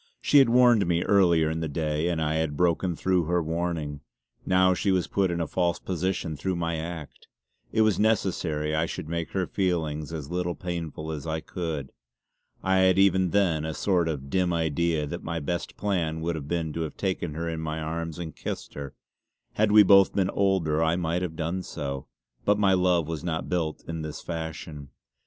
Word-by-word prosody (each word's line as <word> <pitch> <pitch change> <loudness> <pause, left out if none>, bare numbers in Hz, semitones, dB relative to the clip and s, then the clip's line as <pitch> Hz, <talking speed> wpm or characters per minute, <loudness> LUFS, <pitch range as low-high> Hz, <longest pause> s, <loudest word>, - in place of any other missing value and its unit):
She 145 - +5
had 135 -3 +5
warned 120 -5 +5
me 85 0 +1
earlier 85 -5 +4
in 80 - -2
the 80 - -2
day, 75 +1 -1
and 85 -2 -1
I 80 0 0
had 80 -2 -1
broken 90 +1 +1
through 90 0 +1
her 90 +2 +1
warning. 80 -3 -3 0.5
Now 95 0 +4
she 100 - -1
was 95 -2 +2
put 95 -2 +1
in 85 0 -2
a 85 - 0
false 85 +1 0
position 90 -2 -2
through 90 +6 -2
my 85 -1 -1
act; 80 -2 -7 0.4
it 110 - +2
was 110 -4 +2
necessary 85 -8 +1
I 80 +1 +1
should - - -6
make 85 0 -3
her 95 -2 0
feelings 80 -6 -1
as 75 -3 -6
little 90 -1 -1
painful 80 -3 -5
as 75 0 -5
I 80 0 -1
could. 80 -5 -5 0.7
I 95 0 +2
had 95 -1 +4
even 95 -2 +4
then 85 -5 +2
a 80 0 -3
sort 90 -4 +1
of 70 -3 -5
dim 90 -2 +2
idea 80 -1 0
that 85 +4 -5
my 85 0 -3
best 85 +4 -4
plan 85 -6 -1
would 85 +1 -1
have 75 -3 -6
been 80 -2 -2
to 85 - -3
have 80 - -5
taken 90 -5 -2
her 85 +1 -3
in 80 -1 -3
my 80 0 -3
arms 80 +1 -4
and 85 -3 -6
kissed - - -6
her. 70 -1 -7 0.6
Had 105 0 +2
we 105 0 +9
both 100 -1 +6
been 95 -1 +1
older 90 -6 +1
I 80 +1 +2
might 85 0 -1
have 85 -3 -3
done 85 +3 -2
so; 70 -6 -5 0.4
but 105 0 +3
my 100 -2 +4
love 90 -3 +2
was 80 -1 -4
not 80 -2 -3
built 80 -4 -2
in 80 -1 -4
this 75 -1 -6
fashion. 80 -3 -6
85 Hz, 200 wpm, -26 LUFS, 80-90 Hz, 0.7 s, we